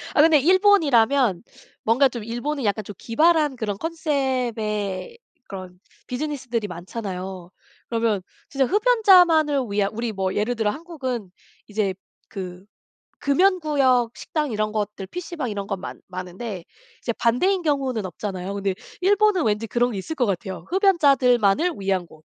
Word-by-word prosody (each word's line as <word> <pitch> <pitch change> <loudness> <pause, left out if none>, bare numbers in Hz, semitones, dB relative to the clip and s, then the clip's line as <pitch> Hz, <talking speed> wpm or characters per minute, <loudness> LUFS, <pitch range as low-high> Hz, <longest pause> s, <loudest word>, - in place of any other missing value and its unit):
아 - - +4
근데 320 -2 +6
일본이라면 280 - +4 0.4
뭔가 255 +5 +4
좀 235 -4 -7
일본은 250 +4 -3
약간 210 0 0
좀 205 - -8
기발한 305 +2 +2
그런 210 -4 -3
콘셉트의 255 - -2 0.3
그런 185 -2 -8 0.3
비즈니스들이 250 -5 -3
많잖아요. 185 0 -6 0.4
그러면 225 -4 0 0.3
진짜 275 -4 +1
흡연자만을 365 - +5
위한 200 -1 +1
우리 230 0 -3
뭐 190 -1 -2
예를 225 +4 0
들어 215 -2 +1
한국은 260 - -5 0.4
이제 205 -3 -1 0.3
그 185 -2 -7 0.5
금연구역 280 -7 +2
식당 300 -3 -2
이런 215 -1 -1
것들 210 -2 -3
PC방 335 -7 -5
이런 200 -1 -4
건 195 -3 -4
많 - - -8
많은데 185 +1 -6 0.4
이제 235 - -1
반대인 355 - +1
경우는 265 - 0
없잖아요. 190 +1 -5
근데 195 -1 -1 0.3
일본은 405 -2 +3
왠지 215 +1 0
그런 245 +2 +1
게 200 - -4
있을 315 +12 -5
것 250 - +2
같아요, 185 -2 -3
흡연자들만을 290 - +3
위한 190 -3 -1
곳. 155 -1 -18
235 Hz, 320 characters per minute, -23 LUFS, 200-300 Hz, 0.5 s, 근데